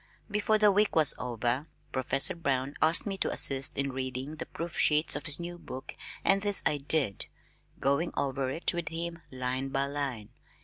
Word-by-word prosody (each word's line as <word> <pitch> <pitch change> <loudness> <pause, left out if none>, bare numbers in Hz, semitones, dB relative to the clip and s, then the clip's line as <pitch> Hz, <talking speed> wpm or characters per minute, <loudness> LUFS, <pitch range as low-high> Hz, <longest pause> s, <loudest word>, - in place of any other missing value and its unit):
Before 210 +1 +2
the 210 -1 +5
week 210 +2 +2
was 155 -3 +6
over, 125 +4 -2 0.2
Professor 130 +1 -1
Brown 140 -4 -1
asked 160 +2 +6
me 195 -2 -4
to - - 0
assist 135 0 +2
in 140 0 -1
reading 130 +3 -4
the - - -6
proof 170 0 -6
sheets 150 +1 +2
of - - -4
his 145 +1 +2
new 175 0 -7
book 130 -5 -8 0.3
and 195 0 +4
this 205 0 +5
I 150 - +2
did, 140 - 0 0.5
going 140 +5 0
over 135 -1 -1
it 160 +8 +2
with 175 -1 -3
him 170 0 -5
line 130 +1 -3
by 135 +1 0
line. 140 -7 -4
140 Hz, 180 wpm, -29 LUFS, 130-170 Hz, 0.5 s, was